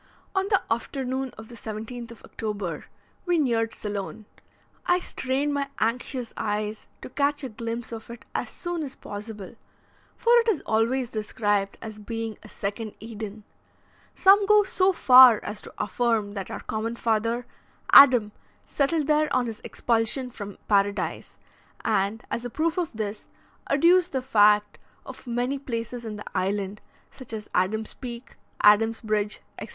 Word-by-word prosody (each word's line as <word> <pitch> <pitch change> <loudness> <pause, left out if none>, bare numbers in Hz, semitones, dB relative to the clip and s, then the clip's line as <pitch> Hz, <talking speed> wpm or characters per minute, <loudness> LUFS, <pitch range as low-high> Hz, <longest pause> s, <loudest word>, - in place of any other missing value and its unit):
On 385 0 +1
the 395 -3 +4
afternoon 260 +2 -3
of 220 0 -10
the 240 - -11
17th 225 +2 -7
of 235 - -13
October, 200 -8 -5 0.4
we 350 -1 +3
neared 230 -6 +1
Ceylon. 205 +1 -5 0.6
I 355 - +4
strained 280 -3 -1
my 280 -1 -1
anxious 245 +1 -2
eyes 210 0 -3 0.2
to - - -7
catch 285 +2 0
a 265 - -3
glimpse 230 +1 -5
of 225 0 -8
it 235 +2 -10
as - - -2
soon 345 -2 -4
as 275 -3 -5
possible, 205 -1 -8 0.6
for 470 - +1
it 465 - 0
is 385 -9 0
always 235 +3 +1
described 205 -2 -1
as 220 -1 -8
being 225 +1 -5
a - - -13
second 210 +2 -5
Eden; 215 -1 -7 0.7
some 395 +1 +6
go 420 0 +6
so 380 -1 +2
far 255 - +8
as 210 0 -5
to - - -12
affirm 215 -1 0
that 195 -3 -5
our - - -6
common 220 +2 -3
father, 230 +1 0 0.5
Adam, 250 -6 +8 0.3
settled 300 +2 0
there 305 +1 +2
on 255 -1 +2
his 225 -2 -6
expulsion 235 +2 0
from 205 -3 -8
Paradise, 200 -1 0 0.5
and, 200 +4 0
as 235 - -2
a 245 - -4
proof 325 +7 0
of 340 -3 -2
this, 215 -1 -5 0.4
adduce 350 +5 +4
the 265 -5 -2
fact 210 -4 +4 0.3
of 260 0 -10
many 245 +3 -1
places 235 -2 -5
in 215 -1 -5
the 210 - -8
island, 195 +1 -2 0.3
such 260 -4 -11
as 215 -1 -7
Adam's 215 +4 0
Peak, 240 -1 -8 0.3
Adam's 225 +2 +5
Bridge, 215 -1 -1 0.2
etc. - - -7
230 Hz, 155 wpm, -26 LUFS, 210-265 Hz, 0.7 s, far